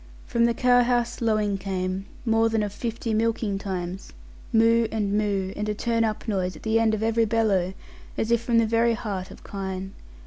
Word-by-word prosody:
From 235 0 +2
the 235 0 +1
cowhouse 245 -1 +2
lowing 215 -3 +1
came, 190 0 -3 0.2
more 225 0 +3
than 225 -1 +1
of 205 -1 -4
fifty 230 0 -3
milking 220 -2 0
times; 185 -1 -5 0.4
moo 230 0 +4
and 210 -2 -1
moo, 200 -2 0
and 210 +1 -3
a 210 - -1
turn 230 +1 0
up 220 +1 -2
noise 185 -4 -1
at - - -13
the 225 0 +2
end 220 -1 +3
of 215 - -3
every 225 0 +2
bellow, 205 -5 +1 0.4
as 225 - -1
if 235 -1 +3
from 235 0 +1
the 230 - +5
very 230 +1 +2
heart 200 -5 -4
of - - -13
kine. 190 -1 -5
220 Hz, 195 wpm, -25 LUFS, 195-230 Hz, 0.4 s, the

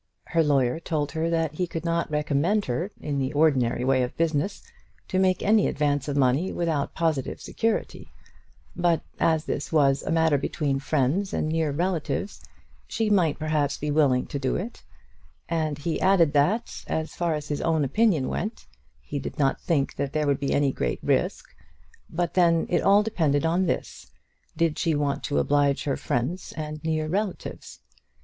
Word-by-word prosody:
Her 165 - +1
lawyer 140 -3 +2
told 155 -4 -2
her 160 +1 -1
that 165 -2 0
he 180 +3 -2
could 165 0 -5
not 170 0 0
recommend 150 +7 +1
her, 165 +10 -2
in 145 -2 -2
the 135 0 -1
ordinary 130 -5 +2
way 130 -1 +3
of 125 - -3
business, 165 +3 0 0.5
to 185 - +1
make 185 -1 +2
any 210 0 +4
advance 145 -1 0
of 145 -1 -2
money 140 +7 +2
without 160 -5 -1
positive 160 -6 -1
security; 225 -1 -2 0.6
but, 175 -2 +1 0.2
as 160 -1 +2
this 145 - -3
was 140 -4 +3
a - - -6
matter 160 -3 +3
between 140 -1 -1
friends 150 +7 0
and - - 0
near 160 -1 0
relatives, 175 +4 -2 0.5
she 220 -2 -1
might 170 -7 +3
perhaps 150 -2 0
be 150 0 -2
willing 140 -4 +3
to 140 - -5
do 130 -1 -1
it; 225 +7 -5 0.7
and 155 -3 -1
he 160 +2 -3
added 175 -6 +4
that, 165 +11 +1
as 160 0 -2
far 170 -2 0
as 150 -1 -6
his 145 - -2
own 160 -2 +1
opinion 165 - +2
went, 215 +3 -4 0.4
he 145 - -4
did - - -6
not 135 -2 +1
think 145 -5 0
that 140 -1 -2
there 155 -1 +1
would 140 -1 +1
be 140 - -1
any 140 -1 +2
great - - -2
risk. - - 0 0.6
But 175 0 -2
then 170 -2 +3
it 175 - +2
all 200 +1 +5
depended 160 -9 +1
on 175 +3 +2
this: - - -3 0.5
did 165 -2 +1
she 165 -3 +1
want 145 -1 -1
to 145 - -1
oblige 145 -1 +2
her 140 - 0
friends 135 +10 -3
and 155 0 -5
near 155 -1 -1
relatives? 195 +4 -4
155 Hz, 175 wpm, -25 LUFS, 145-170 Hz, 0.7 s, all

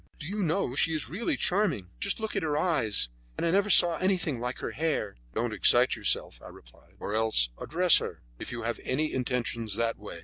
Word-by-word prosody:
"Do 145 - -7
you 205 +3 -3
know, 165 -6 0
she 160 +4 +2
is 155 - -4
really 235 - -2
charming. 170 - 0
Just 200 - -1
look 220 -1 -4
at 195 - 0
her 150 -3 -1
eyes; 115 - +1 0.3
and - - -2
I 165 - +1
never 200 +3 +2
saw 175 -3 +6
anything 180 -8 0
like 125 +1 -4
her - - -5
hair." 150 -9 -2 0.2
"Don't - - -1
excite - - +4
yourself," - - 0
I - - -10
replied, - - -19
"or 105 - -5
else 110 - +2
address 180 +2 +5
her, - - -7 0.2
if - - -7
you 120 -1 -5
have 115 0 -3
any 150 +4 -1
intentions 120 -4 -2
that 115 0 -1
way. 100 -5 -9
150 Hz, 210 wpm, -28 LUFS, 115-180 Hz, 0.3 s, saw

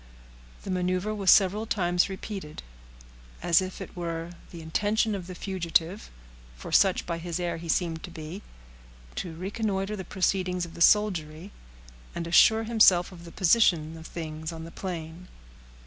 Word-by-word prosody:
The - - -4
maneuver 185 +3 -1
was 200 -3 0
several 210 +3 +5
times 180 -3 +1
repeated, 190 - -7 0.8
as 175 0 +4
if 185 0 -6
it - - -9
were 170 -1 -4 0.2
the 170 - -10
intention 205 +7 0
of 185 -3 -5
the 185 - -7
fugitive 175 0 -1 0.5
(for - - -9
such 190 -2 +4
by 170 -1 -3
his 170 0 -4
air 170 -2 -2
he 165 0 -8
seemed 165 -1 0
to - - -10
be) 165 +4 -8 0.7
to 170 -3 -5
reconnoiter 195 +2 -2
the 190 - -6
proceedings 185 -2 -1
of 165 - -12
the - - -10
soldiery, 175 -3 +2 0.6
and 170 - -3
assure 220 +6 +5
himself 215 -6 +4
of 175 -2 -12
the 170 - -10
position 170 -5 +3
of 160 0 -10
things 160 -1 -6
on 160 -1 -8
the 165 - -9
plain. 170 -1 -6
180 Hz, 160 wpm, -27 LUFS, 165-195 Hz, 0.8 s, several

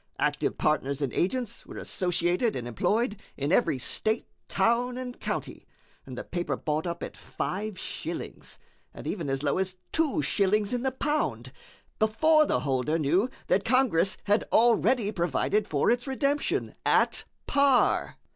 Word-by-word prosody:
Active - - 0
partners 140 -2 0
and 135 - -2
agents 240 +5 -1
were - - -10
associated 180 +5 0
and 120 - -4
employed 210 - 0 0.2
in 140 +2 -1
every 195 - +3
state, 220 - +1 0.2
town, 245 +2 +1
and 250 -1 -6
county, - - -4 0.4
and - - -8
the - - -4
paper 175 -1 -3
bought 155 +2 -2
up 170 0 -4
at - - -6
five 205 +1 -4
shillings, - - -6 0.4
and - - -9
even 170 -8 -3
as 135 +1 -1
low 145 +4 +1
as 185 -1 -1
two 315 -2 +1
shillings 205 +2 +1
in 245 - 0
the 265 +1 0
pound, 295 +3 -2 0.5
before 305 +8 +4
the - - +1
holder 135 +3 0
knew 170 - +2 0.2
that 195 - +2
Congress 230 -7 +2
had 205 +2 +2
already 235 -1 +4
provided 200 +3 0
for 145 +2 +2
its 240 +2 0
redemption 280 +2 0
at - - +2 0.2
par." 280 -2 +3
210 Hz, 150 wpm, -27 LUFS, 170-250 Hz, 0.5 s, before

